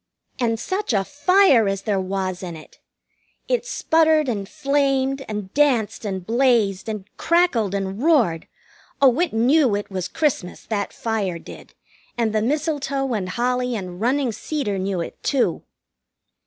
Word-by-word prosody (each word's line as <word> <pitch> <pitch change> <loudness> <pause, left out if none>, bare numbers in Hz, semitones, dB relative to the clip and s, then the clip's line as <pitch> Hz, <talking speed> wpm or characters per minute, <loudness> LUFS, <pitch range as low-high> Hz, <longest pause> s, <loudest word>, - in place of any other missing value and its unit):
And 230 -2 0
such 375 - -2
a 195 -2 +2
fire 290 - +4
as 195 0 -2
there 205 -3 0
was 185 -1 -3
in 175 -3 -6
it! 155 - -14 0.7
It - - 0
sputtered 320 - +3
and 205 -5 -3
flamed, 275 -1 0
and 210 -3 -5
danced 255 -8 +1
and 190 -3 -4
blazed, 225 -5 +2
and 210 -3 -5
crackled 260 - +2
and 195 +2 -3
roared. 245 - +2 0.5
Oh, 270 0 +4
it 355 - +1
knew 245 +1 +3
it 205 0 -5
was 185 -2 -3
Christmas, 260 - -2
that 205 -2 -2
fire 210 -6 -2
did, - - -12 0.4
and 225 -2 0
the 215 - +1
mistletoe 275 0 -1
and 190 -4 -2
holly 250 +3 0
and 185 -3 -6
running 255 +2 +1
cedar 220 -5 -3
knew 190 -2 -1
it, - - -7
too! 275 -3 0
230 Hz, 150 wpm, -22 LUFS, 195-280 Hz, 0.7 s, fire